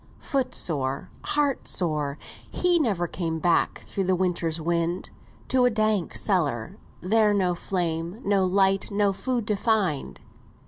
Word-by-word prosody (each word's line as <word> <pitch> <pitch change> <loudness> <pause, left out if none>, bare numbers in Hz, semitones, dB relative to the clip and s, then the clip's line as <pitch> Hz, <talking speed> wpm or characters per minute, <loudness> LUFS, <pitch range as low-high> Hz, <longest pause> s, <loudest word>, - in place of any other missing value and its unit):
Foot 260 -3 -2
sore, 135 -4 -1
heart 290 -2 0
sore, 150 -5 -1 0.3
he 355 -1 +2
never 205 - +1
came 165 -2 -3
Back 170 +1 +1
through 195 - -2
the 185 0 +2
winter's 175 -3 0
wind, 170 +2 -1 0.4
To 255 -1 +4
a - - +5
dark 215 -5 0
cellar, 145 - 0 0.2
there 210 +2 +3
no 185 -3 +2
flame, 175 +1 -2
No 200 -1 +3
light, 195 +1 +3
no 205 -1 +2
food, 245 +2 -2
to 210 -1 0
find. 195 - 0
185 Hz, 140 wpm, -25 LUFS, 165-215 Hz, 0.4 s, a